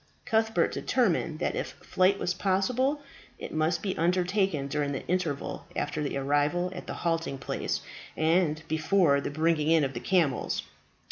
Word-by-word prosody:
Cuthbert 220 Hz, -1 st, +2 dB
determined 180 Hz, -10 st, 0 dB
that -, -, -1 dB
if -, -, -3 dB
flight 185 Hz, +2 st, +1 dB
was 180 Hz, -, -1 dB
possible 250 Hz, +10 st, +1 dB, 0.3 s
it -, -, -7 dB
must 155 Hz, +2 st, 0 dB
be 195 Hz, -2 st, -1 dB
undertaken 180 Hz, -2 st, +1 dB
during 145 Hz, 0 st, -1 dB
the 135 Hz, -, -5 dB
interval 170 Hz, -6 st, -2 dB
after 150 Hz, +1 st, -2 dB
the 145 Hz, -1 st, -2 dB
arrival 145 Hz, +6 st, +1 dB
at 180 Hz, -, -8 dB
the -, -, -4 dB
halting 165 Hz, -4 st, 0 dB
place 135 Hz, -, -3 dB, 0.4 s
and 160 Hz, -1 st, +2 dB
before 160 Hz, -2 st, +3 dB
the -, -, -3 dB
bringing 155 Hz, +1 st, +1 dB
in 165 Hz, -2 st, +5 dB
of 135 Hz, -1 st, -1 dB
the 120 Hz, -, -4 dB
camels. 165 Hz, -5 st, +1 dB
165 Hz, 155 wpm, -28 LUFS, 150-185 Hz, 0.4 s, in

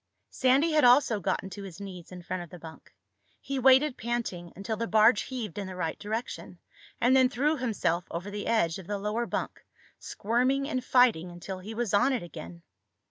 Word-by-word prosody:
Sandy 270 Hz, +5 st, +3 dB
had 310 Hz, -1 st, +3 dB
also 245 Hz, -3 st, +5 dB
gotten 190 Hz, 0 st, -2 dB
to 200 Hz, -, -7 dB
his 190 Hz, -3 st, -9 dB
knees 185 Hz, -4 st, -9 dB
in 180 Hz, -1 st, -9 dB
front 180 Hz, +1 st, -4 dB
of 175 Hz, -, -9 dB
the 180 Hz, -, -10 dB
bunk. 160 Hz, -1 st, -12 dB, 0.5 s
He 275 Hz, -1 st, -4 dB
waited, 265 Hz, +2 st, +5 dB
panting, 225 Hz, -7 st, -3 dB
until 200 Hz, +4 st, -4 dB
the 230 Hz, +1 st, -3 dB
barge 220 Hz, 0 st, +5 dB
heaved 225 Hz, -7 st, -5 dB
in 200 Hz, -, -4 dB
the 185 Hz, -, -7 dB
right 165 Hz, -3 st, -3 dB
direction, 220 Hz, +3 st, -5 dB, 0.4 s
and 255 Hz, +2 st, +4 dB
then 260 Hz, -1 st, +5 dB
threw 285 Hz, +5 st, +1 dB
himself 210 Hz, -, -1 dB
over 180 Hz, +5 st, -5 dB
the 205 Hz, 0 st, -5 dB
edge 195 Hz, -7 st, +1 dB
of 180 Hz, -, -11 dB
the 205 Hz, -, -2 dB
lower 210 Hz, +4 st, -2 dB
bunk, -, -, -4 dB, 0.4 s
squirming 255 Hz, +6 st, 0 dB
and 255 Hz, -4 st, -2 dB
fighting 245 Hz, -10 st, +3 dB
until 175 Hz, +2 st, -7 dB
he 215 Hz, +4 st, -8 dB
was 235 Hz, -2 st, -2 dB
on 205 Hz, +7 st, +4 dB
it 245 Hz, -, -2 dB
again. 170 Hz, 0 st, -10 dB
215 Hz, 195 wpm, -28 LUFS, 185-250 Hz, 0.5 s, also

